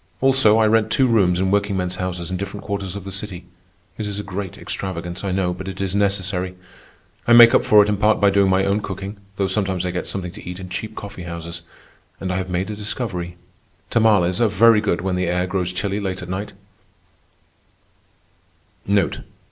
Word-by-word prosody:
Also, 130 Hz, -5 st, +4 dB
I 110 Hz, -, +4 dB
rent 110 Hz, 0 st, +2 dB
two 130 Hz, +4 st, +4 dB
rooms 100 Hz, -7 st, +3 dB
in 95 Hz, 0 st, +1 dB
workingmen's 95 Hz, -3 st, 0 dB
houses 90 Hz, -1 st, -4 dB
in 95 Hz, -, -1 dB
different 100 Hz, +2 st, -6 dB
quarters 100 Hz, -2 st, -4 dB
of 100 Hz, -, -6 dB
the 95 Hz, -, -7 dB
city. 95 Hz, -3 st, -5 dB, 0.5 s
It 105 Hz, -, -2 dB
is 100 Hz, -1 st, -4 dB
a 105 Hz, -, -4 dB
great 95 Hz, 0 st, -5 dB
extravagance, 90 Hz, -1 st, -5 dB
I 100 Hz, -, -1 dB
know, 90 Hz, -1 st, 0 dB
but 95 Hz, +2 st, -8 dB
it 95 Hz, -1 st, -6 dB
is 95 Hz, -2 st, -2 dB
necessary. 95 Hz, -2 st, 0 dB, 0.7 s
I 120 Hz, -, +6 dB
make 120 Hz, 0 st, +9 dB
up -, -, +4 dB
for 105 Hz, -1 st, +6 dB
it -, -, -3 dB
in 105 Hz, -1 st, 0 dB
part 105 Hz, +1 st, +3 dB
by 100 Hz, -1 st, +4 dB
doing 100 Hz, -1 st, +3 dB
my 95 Hz, +1 st, +3 dB
own 100 Hz, +2 st, +1 dB
cooking, 100 Hz, +1 st, -6 dB, 0.2 s
though 100 Hz, -, 0 dB
sometimes 95 Hz, -2 st, -1 dB
I 90 Hz, -, -1 dB
get 90 Hz, -, -3 dB
something 90 Hz, -3 st, -4 dB
to 105 Hz, -, -11 dB
eat 90 Hz, +1 st, -7 dB
in 95 Hz, -1 st, -8 dB
cheap 110 Hz, +5 st, -5 dB
coffee 100 Hz, -2 st, -8 dB
houses. 85 Hz, 0 st, -7 dB, 0.6 s
And 95 Hz, -1 st, -3 dB
I -, -, -1 dB
have 95 Hz, -1 st, -3 dB
made 90 Hz, +3 st, -2 dB
a -, -, -5 dB
discovery. 100 Hz, -5 st, -4 dB, 0.5 s
Tamales 105 Hz, -5 st, +3 dB
are 115 Hz, -, +5 dB
very 110 Hz, +1 st, +5 dB
good 100 Hz, -5 st, 0 dB
when 95 Hz, 0 st, -1 dB
the 90 Hz, 0 st, 0 dB
air 90 Hz, +1 st, 0 dB
grows 90 Hz, -1 st, -1 dB
chilly 100 Hz, +2 st, -2 dB
late 95 Hz, -2 st, -4 dB
at 90 Hz, -, -9 dB
night. 100 Hz, +3 st, -4 dB
95 Hz, 205 wpm, -21 LUFS, 90-105 Hz, 0.7 s, make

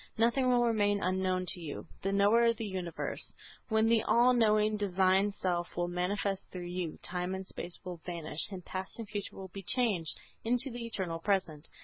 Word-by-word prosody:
Nothing 240 Hz, +3 st, +3 dB
will 245 Hz, -1 st, +4 dB
remain 205 Hz, -3 st, +2 dB
unknown 185 Hz, 0 st, +1 dB
to 180 Hz, -, -1 dB
you, 155 Hz, -4 st, -6 dB, 0.2 s
the 195 Hz, -, 0 dB
Knower 205 Hz, +4 st, +5 dB
of 230 Hz, -1 st, +3 dB
the 225 Hz, -, -3 dB
universe. 185 Hz, -4 st, -4 dB, 0.3 s
When 220 Hz, 0 st, +3 dB
the 225 Hz, -1 st, +4 dB
all 240 Hz, +3 st, +5 dB
knowing 215 Hz, -2 st, +4 dB
Divine 195 Hz, 0 st, +3 dB
Self 175 Hz, -3 st, -2 dB
will 175 Hz, 0 st, +1 dB
manifest 190 Hz, +2 st, -1 dB
through 180 Hz, -1 st, -6 dB
you, 175 Hz, -3 st, -3 dB
time 180 Hz, +1 st, -2 dB
and 190 Hz, 0 st, -5 dB
space 175 Hz, -1 st, -6 dB
will 180 Hz, -1 st, -5 dB
vanish 165 Hz, 0 st, -1 dB
and 185 Hz, -3 st, -7 dB
past 190 Hz, 0 st, -5 dB
and 230 Hz, -2 st, -6 dB
future 205 Hz, -1 st, -4 dB
will 190 Hz, -1 st, -8 dB
be 195 Hz, -, -6 dB
changed 210 Hz, -, 0 dB, 0.2 s
into 245 Hz, +3 st, +1 dB
the 235 Hz, 0 st, -5 dB
eternal 185 Hz, -7 st, -3 dB
present. 165 Hz, -5 st, 0 dB
195 Hz, 190 wpm, -32 LUFS, 180-220 Hz, 0.3 s, Knower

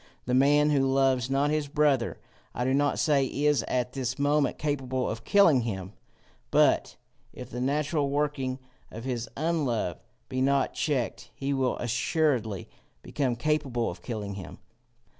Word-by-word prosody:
The 125 Hz, -, -1 dB
man 145 Hz, +3 st, +4 dB
who 135 Hz, -2 st, +2 dB
loves 135 Hz, -2 st, +2 dB
not 140 Hz, +2 st, +1 dB
his 155 Hz, -1 st, 0 dB
brother, 145 Hz, -4 st, +1 dB, 0.4 s
I 125 Hz, -, -1 dB
do 130 Hz, -, +1 dB
not 145 Hz, +1 st, +2 dB
say 145 Hz, -4 st, +3 dB
is 145 Hz, 0 st, +1 dB
at 125 Hz, 0 st, -1 dB
this 130 Hz, -2 st, -3 dB
moment 145 Hz, 0 st, +1 dB
capable 130 Hz, -3 st, -1 dB
of 110 Hz, +1 st, -4 dB
killing 170 Hz, -10 st, +5 dB
him, 95 Hz, -4 st, -4 dB, 0.6 s
but -, -, +3 dB, 0.4 s
if 125 Hz, 0 st, -9 dB
the 125 Hz, -, -4 dB
natural 145 Hz, +2 st, 0 dB
working 140 Hz, -3 st, -1 dB, 0.3 s
of 115 Hz, -, -8 dB
his 125 Hz, -1 st, -3 dB
unlove 140 Hz, -, -1 dB, 0.3 s
be 130 Hz, -1 st, -2 dB
not 140 Hz, +1 st, +2 dB
checked, 125 Hz, -5 st, -2 dB
he 140 Hz, +1 st, -2 dB
will 130 Hz, -2 st, 0 dB
assuredly 120 Hz, -, 0 dB, 0.4 s
become 130 Hz, -5 st, -1 dB
capable 130 Hz, -, 0 dB
of 85 Hz, -, -11 dB
killing 105 Hz, -4 st, -5 dB
him. 95 Hz, -2 st, -8 dB
135 Hz, 150 wpm, -28 LUFS, 120-145 Hz, 0.6 s, killing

